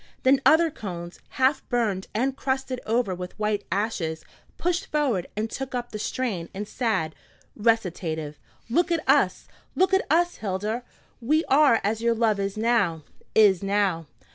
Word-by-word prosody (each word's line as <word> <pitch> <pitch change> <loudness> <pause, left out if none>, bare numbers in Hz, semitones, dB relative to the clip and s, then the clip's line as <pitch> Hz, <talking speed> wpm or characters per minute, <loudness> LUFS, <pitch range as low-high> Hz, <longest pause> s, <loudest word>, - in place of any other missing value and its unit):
Then 270 +1 +4
other 325 +1 +5
cones, 175 -7 -7
half 265 +1 +2
burned 220 -7 0
and 260 +4 0
crusted 265 -1 -2
over 225 -3 +1
with 180 0 -7
white 210 -1 -1
ashes, 185 -6 -2 0.3
pushed 355 +1 -1
forward 265 - 0
and 215 +1 0
took 265 +2 -5
up 245 0 -4
the 215 - -5
strain 205 -8 -2
in 205 +2 -4
sad 210 -9 -1 0.4
recitative: 175 -9 -1 0.3
"Look 340 +9 +1
at 330 -2 -1
us! - - +3 0.3
look 380 +1 +2
at 385 - +3
us, 345 +3 +2
Hilda! 210 +3 -2 0.4
We 310 +7 +2
are 275 -4 +5
as 220 +2 -1
your 235 0 +2
love 220 -3 +2
is 195 +1 -2
now, 215 -9 +1 0.3
is 200 -5 +5
now. 195 -5 0
225 Hz, 155 wpm, -25 LUFS, 195-265 Hz, 0.4 s, other